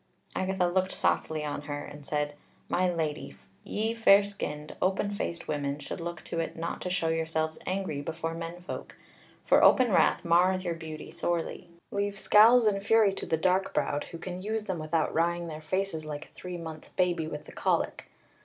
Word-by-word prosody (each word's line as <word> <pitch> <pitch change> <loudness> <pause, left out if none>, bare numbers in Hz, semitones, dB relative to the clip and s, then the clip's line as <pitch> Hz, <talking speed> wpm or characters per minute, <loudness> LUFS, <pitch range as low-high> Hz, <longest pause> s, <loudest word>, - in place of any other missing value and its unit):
Agatha 190 -1 +1
looked 185 +1 +1
softly 155 -1 0
on 145 -1 -3
her 145 0 -5
and 145 -1 -11
said: 150 -1 -1 0.3
"My 180 0 +2
Lady. 155 -3 -3 0.3
Ye 220 +2 -1
fair 205 -3 +6
skinned, 150 -7 -5
open 190 +2 +1
faced 170 -4 -4
women 145 -1 -1
should 150 - -6
look 170 -1 -5
to 170 - -4
it 165 - -2
not 165 +1 -4
to 180 - -3
show 180 -3 0
yourselves 160 -1 -1
angry 185 -6 -2
before 165 +2 -3
men 165 +1 -6
folk. 180 - -7 0.5
For - - +5
open 255 -4 +6
wrath - - +4
marreth 180 +2 +4
your 175 -2 -1
beauty 160 -2 -8
sorely. 175 0 -2 0.2
Leave 200 0 -1
scowls 225 +4 +7
and 200 -2 +2
fury 215 -1 +5
to - - -5
the 160 - +1
dark 185 +3 +1
browed, 145 - 0
who 170 - -8
can 180 +2 -6
use 215 +2 -2
them 185 -4 -2
without 155 0 0
wrying 170 +1 +1
their 155 0 -6
faces 185 0 -2
like 150 -1 -6
a - - -21
three 180 -1 -7
months' 160 -2 -8
baby 175 -3 0
with 150 -1 -6
the - - -11
colic. - - -1
170 Hz, 190 wpm, -29 LUFS, 155-190 Hz, 0.5 s, scowls